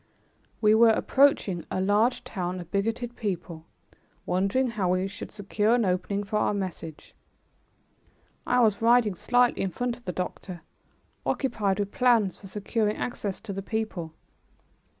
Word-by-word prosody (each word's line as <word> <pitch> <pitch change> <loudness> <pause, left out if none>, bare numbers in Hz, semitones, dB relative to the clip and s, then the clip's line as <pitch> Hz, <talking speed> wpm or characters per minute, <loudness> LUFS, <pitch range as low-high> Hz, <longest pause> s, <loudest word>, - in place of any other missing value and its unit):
We 215 -1 +5
were 230 +1 +6
approaching 220 -7 +3
a - - -2
large 210 +6 +2
town 180 -2 -4
of 175 -1 -10
bigoted 225 +4 -2
people, 175 -6 -5 0.6
wondering 195 +8 +1
how 195 -6 0
we 185 +1 0
should 195 - -8
secure 210 +2 0
an 235 -3 +1
opening 190 +2 -1
for 210 +1 -2
our 210 - +1
message. 175 -5 -6 1.3
I 250 0 +3
was 215 -3 +2
riding 230 -2 +4
slightly 245 +6 +2
in 195 - 0
front 245 +5 -3
of 245 - -22
the 180 - -2
doctor, 180 -1 -5 0.6
occupied 205 -8 0
with 200 -1 -2
plans 235 -6 +3
for 195 - -12
securing 210 +2 -1
access 205 -5 -4
to 210 -3 -6
the 195 - -4
people. 190 -7 -4
205 Hz, 150 wpm, -27 LUFS, 185-230 Hz, 1.3 s, were